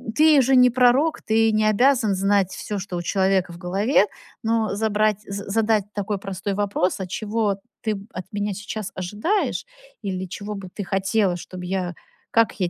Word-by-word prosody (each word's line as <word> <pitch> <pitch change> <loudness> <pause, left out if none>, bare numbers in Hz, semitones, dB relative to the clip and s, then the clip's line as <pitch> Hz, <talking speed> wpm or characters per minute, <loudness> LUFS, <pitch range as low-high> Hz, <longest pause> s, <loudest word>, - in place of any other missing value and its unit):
ты 305 -2 +6
же 265 +2 +3
не 250 0 +7
пророк. 255 +6 +3
Ты 225 0 +3
не 215 0 +2
обязан 225 0 +3
знать 195 0 +2
всё, 210 - -5
что 190 -1 -6
у - - -2
человека 190 0 +1
в 170 - -10
голове. 195 +6 +2 0.4
Но 225 -2 +1
забрать 215 -1 +1
з 200 0 -5
задать 215 -1 +2
такой 205 0 -2
простой 195 0 -4
вопрос: 200 -2 0
"А 190 - -4
чего 210 +1 -1 0.2
ты, 220 - -1
м, 200 0 -8
от 185 - -6
меня 205 0 -2
сейчас 205 +1 -5
ожидаешь? 210 - -1 0.4
Или 190 -2 -3
чего 205 +3 -6
бы 195 -2 -8
ты 205 - -4
хотела, 195 0 +1
чтоб 180 +1 -8
я, 180 -1 -2 0.4
как 225 -1 +2
я, 180 -2 +1
205 Hz, 180 wpm, -23 LUFS, 190-220 Hz, 0.4 s, не